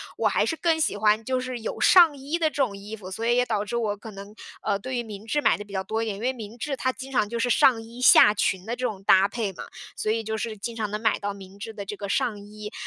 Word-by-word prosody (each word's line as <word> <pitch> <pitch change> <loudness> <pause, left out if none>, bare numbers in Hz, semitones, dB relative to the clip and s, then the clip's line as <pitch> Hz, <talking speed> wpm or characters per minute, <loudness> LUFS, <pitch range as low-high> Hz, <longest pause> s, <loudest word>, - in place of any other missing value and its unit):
我 - - +1
还 - - +2
是 325 - -1
更 325 -1 +1
喜 310 - +1
欢 210 +1 +3
就 260 0 0
是 255 -1 -5
有 225 - -5
上 340 -5 +7
衣 285 +5 -3
的 315 -1 +2
这 - - -21
种 200 -5 -3
衣 210 +2 -8
服， 190 -3 -10
所 225 +4 -4
以 240 +1 +3
也 250 0 +3
导 210 -3 -1
致 235 - -4
我 210 -3 -1
可 220 +2 -10
能， 200 +1 -10 0.3
呃， 200 - -1
对 255 +4 -5
于 240 - -1
明 210 -1 -9
制 295 +6 0
买 - - +3
的 205 - -8
比 200 - -13
较 190 0 -1
多 220 +3 -2
一 - - -1
点。 210 -3 -3
因 205 - -9
为 255 - +2
明 225 -2 -9
制 275 +2 -3
它 260 0 0
经 265 +1 -9
常 215 -5 +1
就 235 +2 -4
是 245 +1 0
上 230 -1 +4
衣 235 +2 -12
下 210 -4 +8
裙 195 -2 -1
的 230 - -3
这 250 +1 -3
种 195 -2 -7
搭 190 +2 +5
配 220 -4 -3
嘛， - - -9 0.3
所 215 - -2
以 225 0 0
就 220 +1 -3
是 220 -1 -4
经 230 +3 -5
常 215 -2 -2
能 210 +1 -4
买 - - +2
到 205 0 -3
明 195 0 -13
制 225 +2 -7
的 205 -2 -6
这 200 +1 -7
个 200 - -5
上 210 +1 0
衣。 210 +1 -9
220 Hz, 330 characters per minute, -25 LUFS, 205-245 Hz, 0.3 s, 下